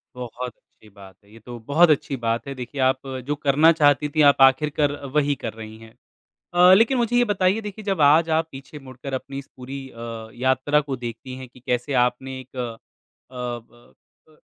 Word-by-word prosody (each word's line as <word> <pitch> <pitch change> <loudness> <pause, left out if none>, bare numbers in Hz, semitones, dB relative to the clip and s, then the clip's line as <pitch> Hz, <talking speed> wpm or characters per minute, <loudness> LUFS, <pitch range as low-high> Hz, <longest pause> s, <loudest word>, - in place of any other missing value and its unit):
बहुत 125 0 -6
अच्छी 110 - -23
बात 100 -2 -15
है, 100 - -23
ये 115 - -14
तो 120 +2 -10
बहुत 165 +4 +5
अच्छी 145 -2 +1
बात 115 +3 -1
है, 140 - -4
देखिए 130 +2 -6
आप 130 0 +2 0.3
जो 145 - 0
करना 150 +2 +4
चाहती 150 -2 +3
थीं 155 - +4
आप 140 -1 +5
आखिर 135 +3 +5
कर 145 -1 +3 0.2
वही 145 -1 +2
कर 115 - -3
रही 110 0 -10
हैं। 115 0 -15 0.6
अ, 180 +1 +7
लेकिन 230 +7 +4
मुझे 240 0 0
ये 245 - +5
बताइए 200 0 +1
देखिए 210 +1 -8
जब 195 -5 -1
आज 155 +3 +5
आप 160 - -1
पीछे 135 +2 -10
मुड़कर 130 0 -9
अपनी 135 +1 -5
इस 140 - -8
पूरी 135 +1 -8
अ, 115 -2 -8
यात्रा 130 +4 +1
को 135 - -1
देखती 120 +1 -7
हैं 130 - -9
कि 125 - -18
कैसे 125 +2 -2
आपने 130 +2 -5
एक 130 0 -14
अ, 120 -3 -4 0.6
ब 120 -1 -8 0.4
अ, 155 - -23
135 Hz, 205 wpm, -23 LUFS, 120-150 Hz, 0.6 s, अ